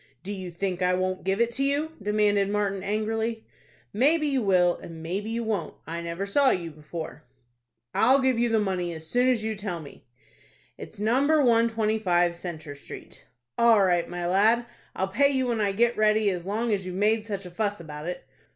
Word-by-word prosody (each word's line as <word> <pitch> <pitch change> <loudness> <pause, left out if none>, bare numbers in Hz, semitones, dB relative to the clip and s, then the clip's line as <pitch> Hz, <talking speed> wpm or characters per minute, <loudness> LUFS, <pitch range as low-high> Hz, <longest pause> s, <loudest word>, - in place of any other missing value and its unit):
"Do 205 - -4
you 185 -2 -6
think 180 +1 -3
I 180 0 +3
won't 185 0 -2
give 195 +2 0
it 235 0 +2
to 265 +3 -1
you?" 285 +3 0
demanded 205 -1 +2
Martin, 200 -2 -1
angrily. 220 +2 -2 0.5
"Maybe 300 +8 +3
you 275 -3 +1
will, 180 -4 +3
and 165 -1 -10
maybe 195 +6 -3
you 230 +1 -2
won't. 210 -8 -2
I 170 +2 -5
never 170 +3 -4
saw 270 +7 +3
you 170 -6 -1
before." 155 0 -8 0.7
"I'll 265 +2 +4
give 260 -3 +2
you 240 0 +2
the 225 -1 +2
money 185 -4 -1
as 160 0 -9
soon 245 +10 +2
as 235 -4 +1
you 220 0 -1
tell 200 -4 -4
me." 145 -4 -13 0.7
"It's - - -11
No. 225 +5 +2
125 225 - +2
Centre 170 -4 -7
Street." 145 - -11 0.3
"All 230 -4 +6
right, 175 -2 +1
my 175 0 -4
lad, 215 +6 +3 0.3
I'll 190 - -1
pay 280 +9 +3
you 265 -2 0
when 235 -3 0
I 200 -1 +2
get 235 +4 +2
ready 215 -1 +3
as 180 -1 -5
long 220 +3 0
as 195 -2 -1
you've 180 0 -6
made 215 +3 +1
such 200 -3 -4
a 180 - -9
fuss 205 +2 -2
about 150 -1 -8
it." 180 - -5
205 Hz, 195 wpm, -26 LUFS, 180-230 Hz, 0.7 s, All